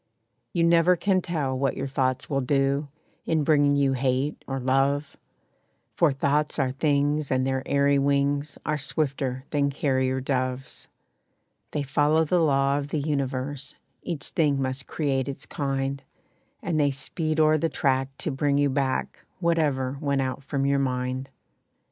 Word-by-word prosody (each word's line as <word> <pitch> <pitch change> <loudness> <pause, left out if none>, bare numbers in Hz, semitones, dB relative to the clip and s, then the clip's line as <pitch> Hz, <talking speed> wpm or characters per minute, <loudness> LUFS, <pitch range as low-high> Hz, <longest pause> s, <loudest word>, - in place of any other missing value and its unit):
You 170 - +1
never 170 +1 +5
can 185 +1 +1
tell 150 -7 -2
what 135 +1 -1
your 135 - -2
thoughts 130 -1 -1
will 140 -2 0
do, 135 +2 +1 0.4
In 160 -2 +2
bringing 145 -1 +4
you 140 -1 +2
hate 130 +2 -1
or 135 0 -2
love; 135 +3 +1 0.8
For 165 -4 +3
thoughts 145 +2 0
are 135 -3 +1
things, 145 +1 +1
and 130 0 +1
their 130 0 0
airy 140 0 +3
wings 140 +1 0
Are 150 0 0
swifter 135 -3 -2
than 145 -1 +2
carrier 130 -2 0
doves. 130 -1 -3 0.8
They 145 - -2
follow 145 +3 +2
the 175 +3 +2
law 140 -2 +2
of 140 - -5
the 155 - -2
universe 140 -1 -3 0.3
Each 160 -5 -4
thing 145 -4 +1
must 130 0 -3
create 135 -4 -1
its 140 - -6
kind, 135 -1 -2 0.6
And 165 -3 0
they 145 -1 +3
speed 155 +3 -3
o'er 155 0 +4
the 165 - 0
track 135 -3 0 0.2
to 155 - 0
bring 140 +1 +1
you 145 -1 +2
back 135 -1 -1 0.2
Whatever 145 -6 0
went 140 -2 +1
out 130 +1 -3
from 135 0 -1
your 140 0 +2
mind. 130 0 -2
140 Hz, 155 wpm, -26 LUFS, 135-150 Hz, 0.8 s, never